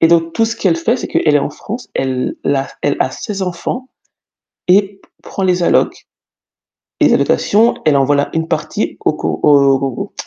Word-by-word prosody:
Et 165 Hz, -, +5 dB
donc 165 Hz, -1 st, +2 dB
tout 225 Hz, -, +2 dB
ce 225 Hz, 0 st, -3 dB
qu'elle 175 Hz, -4 st, +1 dB
fait, 220 Hz, +9 st, 0 dB
c'est -, -, -5 dB
qu'elle 150 Hz, -2 st, +2 dB
est -, -, +4 dB
en 140 Hz, -, -2 dB
France, 225 Hz, +10 st, -8 dB
elle 130 Hz, -1 st, -2 dB
a 135 Hz, -1 st, 0 dB, 0.2 s
elle 145 Hz, -, +1 dB
a 130 Hz, -, +1 dB
ses 195 Hz, +5 st, -5 dB
enfants 190 Hz, +9 st, -4 dB, 0.8 s
et 195 Hz, +1 st, +2 dB, 0.2 s
prend 195 Hz, -, -5 dB
les 180 Hz, -1 st, +1 dB
allocations. -, -, +1 dB, 0.9 s
Les -, -, +5 dB
allocations, 225 Hz, +4 st, +2 dB
elle 150 Hz, -2 st, +4 dB
envoie 140 Hz, +1 st, +2 dB
la 140 Hz, 0 st, 0 dB
une 160 Hz, 0 st, -1 dB
partie -, -, -2 dB
au -, -, +3 dB
Co -, -, -3 dB
au 150 Hz, -1 st, +6 dB, 0.3 s
au 130 Hz, -, -5 dB
170 Hz, 185 wpm, -16 LUFS, 145-200 Hz, 0.9 s, au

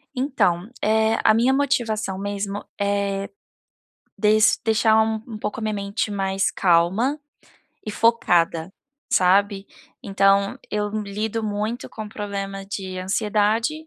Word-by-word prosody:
Então, 230 Hz, -, 0 dB
eh, 220 Hz, +1 st, +2 dB
a -, -, +6 dB
minha 240 Hz, +4 st, +3 dB
motivação 225 Hz, -8 st, 0 dB
mesmo 200 Hz, 0 st, -4 dB, 0.2 s
é 200 Hz, -1 st, -1 dB, 0.9 s
des 215 Hz, 0 st, +4 dB
deixar 220 Hz, 0 st, +4 dB
um 220 Hz, 0 st, -2 dB
um 220 Hz, -3 st, -7 dB
pouco 210 Hz, +1 st, -4 dB
a -, -, -7 dB
minha 215 Hz, -1 st, -1 dB
mente 200 Hz, +1 st, -2 dB
mais 195 Hz, -1 st, 0 dB
calma 190 Hz, -, +2 dB, 0.7 s
e -, -, -2 dB
focada, 175 Hz, -7 st, +2 dB, 0.4 s
sabe. 195 Hz, 0 st, +3 dB, 0.4 s
Então 195 Hz, 0 st, +2 dB
eu 210 Hz, 0 st, -1 dB
lido 210 Hz, +2 st, -3 dB
muito 215 Hz, +3 st, -3 dB
com 215 Hz, -1 st, -8 dB
problema 200 Hz, -2 st, -5 dB
de 190 Hz, -1 st, -6 dB
ansiedade, 215 Hz, +9 st, 0 dB
205 Hz, 120 wpm, -23 LUFS, 195-220 Hz, 0.9 s, a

